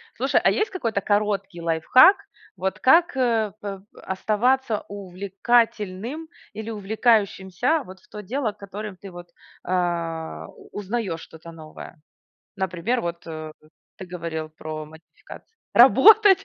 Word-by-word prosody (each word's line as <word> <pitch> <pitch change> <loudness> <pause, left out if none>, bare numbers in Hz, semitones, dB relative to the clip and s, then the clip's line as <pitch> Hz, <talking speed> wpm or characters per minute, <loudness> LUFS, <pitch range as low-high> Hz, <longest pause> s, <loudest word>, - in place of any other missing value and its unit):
Слушай, - - +1
а - - +5
есть 430 - 0
какой-то 230 - -2
короткий 200 -3 -1
лайфхак, 170 - +6 0.4
вот 190 0 -3
как, 330 +3 +4
э, 225 -5 +1
п 195 -2 -6
оставаться 220 +4 0
увлекательным 205 - -1 0.3
или 220 +1 -6
увлекающимся, 220 - +1
вот 185 0 -12
в - - -26
то 210 - -8
дело, 235 +2 -2
котором 200 0 -8
ты 195 +1 -11
вот, 175 0 -11 0.4
а, 165 - -2
у - - -17
узнаёшь 200 -5 -3
что-то 165 +1 -12
новое? 155 0 -12 0.6
Например, 190 +6 -1
вот, 170 0 -5
э, 155 -1 -7 0.5
ты 190 - -9
говорил 165 -3 -5
про 155 0 -7
модификации. 160 - -15 0.2
Работать? 415 -3 +7
200 Hz, 125 wpm, -23 LUFS, 175-235 Hz, 0.6 s, Работать